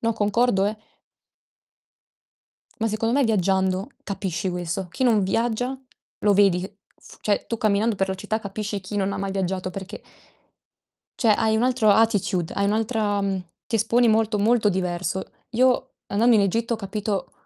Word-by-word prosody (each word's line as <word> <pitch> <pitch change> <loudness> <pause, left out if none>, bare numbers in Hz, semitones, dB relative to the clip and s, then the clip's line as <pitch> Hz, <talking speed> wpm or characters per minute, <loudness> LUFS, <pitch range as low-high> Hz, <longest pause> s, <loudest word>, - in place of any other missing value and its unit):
No, 230 0 +1
concordo, 210 0 +2
eh 215 +1 -2 2.0
Ma 225 0 0
secondo 225 +3 -1
me 280 - +4
viaggiando 190 -1 +1
capisci 190 -2 -3
questo. 180 +1 -3
Chi 260 - -2
non 225 -5 +4
viaggia 240 +6 -1 0.4
lo 205 - +3
vedi 195 -3 +4
che 195 +2 -8 0.2
f - - -15
cioè 205 -1 0
tu 230 - -3
camminando 215 +1 +1
per 195 0 0
la 190 - -1
città, 215 +3 -3
capisci 205 0 -4
chi 200 +3 -6
non 200 0 0
ha - - -3
mai 195 0 -2
viaggiato 185 -1 -2
perché 195 +3 -8 1.2
cioè 220 -3 +4
hai 220 -1 +2
un 225 - +1
altro 250 -4 +3
attitude, 200 -5 +2
hai 200 - 0
un'altra, 215 -1 0
mhmm, 195 -2 -1 0.2
ti 225 - 0
esponi 230 +3 +3
molto 220 -1 +2
molto 215 +1 +3
diverso. 180 -1 -2 0.3
Io 255 +2 +2
andando 230 +4 +3
in 205 - +4
Egitto 230 +4 0
ho - - -4
capito 205 -1 -3
205 Hz, 165 wpm, -24 LUFS, 190-225 Hz, 2.0 s, me